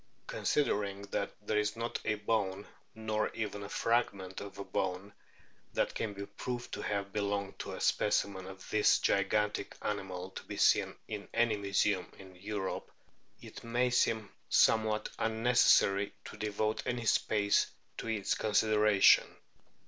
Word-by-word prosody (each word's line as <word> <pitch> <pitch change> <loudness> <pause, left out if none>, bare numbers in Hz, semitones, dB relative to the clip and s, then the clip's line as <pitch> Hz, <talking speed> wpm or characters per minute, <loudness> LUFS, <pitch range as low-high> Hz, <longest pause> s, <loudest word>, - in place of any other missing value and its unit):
Considering 105 - 0
that - - -1
" - - -38
there 105 - +1
is 105 +1 -1
not 115 +1 -3
a 105 - +1
bone, 105 -2 -1 0.3
nor 110 -1 -1
even 105 -2 -3
a 100 - -7
fragment 100 -5 0
of 100 -1 -9
a 100 - -4
bone, 95 +1 -3 0.6
that - - +1
can 110 - -2
be 100 0 -5
proved 120 +3 -5
to - - -4
have 100 -1 -3
belonged 100 -1 -2
to - - -5
a - - -6
specimen 95 -2 +1
of 95 0 -10
this 105 -1 +5
gigantic 105 +1 0
animal 95 -3 -4
to - - -7
be - - -7
seen - - +3
in 105 -2 -6
any 115 -1 +3
museum 100 -1 0
in 95 -1 -13
Europe," 95 +1 -4 0.5
it - - -10
may 120 +2 +1
seem 110 -4 +1 0.2
somewhat 110 -1 +3
unnecessary 110 -3 +3
to - - -8
devote 105 +1 -1
any 120 -2 -2
space 100 -1 +2 0.3
to - - -5
its 110 -3 0
consideration. 105 -1 +4
105 Hz, 150 wpm, -32 LUFS, 100-110 Hz, 0.6 s, this